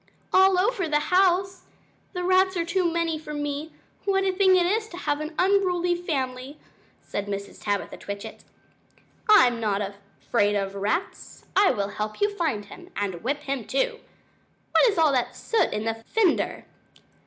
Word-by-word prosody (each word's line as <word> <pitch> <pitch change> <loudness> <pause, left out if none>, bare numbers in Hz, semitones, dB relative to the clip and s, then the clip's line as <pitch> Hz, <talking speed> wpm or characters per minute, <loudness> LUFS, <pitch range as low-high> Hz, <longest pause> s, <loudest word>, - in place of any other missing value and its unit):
"All 380 0 +6
over 390 -1 +1
the 295 0 +3
house! 380 0 +2 0.5
The 360 -1 -3
rats 375 +1 +3
are 335 - 0
too 345 0 +1
many 330 -2 -1
for 300 -1 -7
me. 290 +2 -4 0.3
What 390 -1 +2
a 385 - +2
thing 375 0 +4
it 360 -1 +3
is 430 +4 0
to 345 - -9
have 290 -4 -1
an 310 +1 -6
unruly 365 -2 +2
family!" 275 -5 -3 0.5
said 205 0 -4
Mrs. 200 0 -6
Tabitha 205 -1 -2
Twitchit. 200 0 -8 0.9
"I'm 250 - +6
not 210 -3 0
afraid 205 +1 -2
of 195 -1 -1
rats; 210 - -3
I 395 0 +5
will 200 -1 -1
help 215 +1 -5
you 410 - +3
to - - -12
find 300 - -1
him; 355 - -13
and 190 -4 -3
whip 285 +4 -1
him, 275 -4 -3
too! - - -1 0.7
What - - +5
is 400 - -6
all 320 -3 +4
that 255 -3 0
soot 455 - 0
in 210 - -3
the 225 - 0
fender?" 415 -7 +1
325 Hz, 170 wpm, -25 LUFS, 225-375 Hz, 0.9 s, All